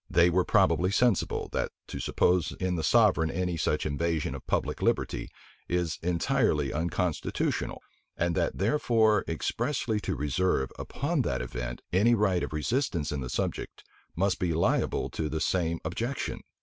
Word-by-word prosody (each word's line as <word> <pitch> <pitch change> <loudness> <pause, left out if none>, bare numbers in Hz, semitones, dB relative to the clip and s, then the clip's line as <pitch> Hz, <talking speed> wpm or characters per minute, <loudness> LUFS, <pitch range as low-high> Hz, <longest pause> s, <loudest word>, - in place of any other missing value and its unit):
They 85 -2 +4
were 90 +1 +3
probably 90 +1 +3
sensible, 120 -1 +1
that - - -1 0.2
to - - -5
suppose 90 -2 +1
in 95 -1 0
the 85 - -1
sovereign 100 -8 +4
any 90 +1 -1
such 80 - 0
invasion 80 +1 -1
of - - -9
public - - -1
liberty, - - 0 0.4
is 85 -3 -1
entirely 80 -4 +1
unconstitutional; 85 +1 -1 0.3
and 85 0 +1
that - - 0
therefore 110 -2 +3
expressly 110 - -1
to - - -3
reserve, 75 0 0
upon 150 +1 -1
that 115 - -1
event, - - -5
any 110 +6 +5
right 95 -5 +2
of - - -3
resistance 85 - -1
in 75 -2 -2
the 65 - -5
subject, - - -3 0.3
must 95 +2 +1
be 85 -3 0
liable 85 - +1
to 80 -1 -2
the 80 - -2
same 85 +1 0
objection. 125 +4 -3
90 Hz, 150 wpm, -28 LUFS, 80-105 Hz, 0.4 s, any